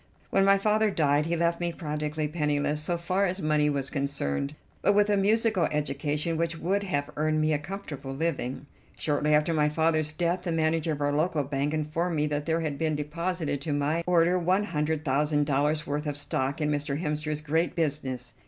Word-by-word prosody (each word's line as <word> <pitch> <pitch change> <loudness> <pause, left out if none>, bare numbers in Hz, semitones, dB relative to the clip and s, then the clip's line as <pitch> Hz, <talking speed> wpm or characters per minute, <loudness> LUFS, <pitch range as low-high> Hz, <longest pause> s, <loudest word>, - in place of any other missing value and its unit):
When 195 - +4
my 195 0 +5
father 215 +2 +2
died 150 -4 +2
he 170 - 0
left 170 0 +1
me 175 0 0
practically 150 -2 -3
penniless 150 -1 0
so 170 +3 -1
far 185 +3 +1
as 185 +2 -3
money 150 -2 +2
was 140 -2 -2
concerned, 140 - -2 0.3
but 200 - +4
with 210 0 +4
a - - +4
musical 205 -2 +2
education 150 +2 -1
which 165 0 -1
would 190 +5 0
have 145 -8 -2
earned 155 +1 +1
me 155 0 +2
a 145 - +1
comfortable 150 -5 -7
living. 140 -2 -2 0.3
Shortly 150 0 +1
after 150 +3 +2
my 150 -1 +3
father's 155 0 +1
death 170 +3 -1
the 180 -1 -3
manager 160 0 +1
of 145 - -6
our 145 0 +1
local 155 0 +1
bank 140 +1 -1
informed 155 +3 -1
me 150 0 +1
that 150 0 -2
there 165 0 +1
had 150 -3 -3
been 160 -2 +1
deposited 160 0 -2
to 150 0 -2
my 145 +4 0
order 175 +1 +4
one 185 +4 +2
hundred 155 -4 -1
thousand 145 +2 +2
dollars' 150 +2 +1
worth 150 +1 -2
of 145 -1 -2
stock 140 0 -1
in 150 -1 0
Mr. 145 0 -1
Hemster's 150 -2 -2
great 160 +3 0
business. 135 -7 -2
155 Hz, 200 wpm, -27 LUFS, 145-170 Hz, 0.3 s, my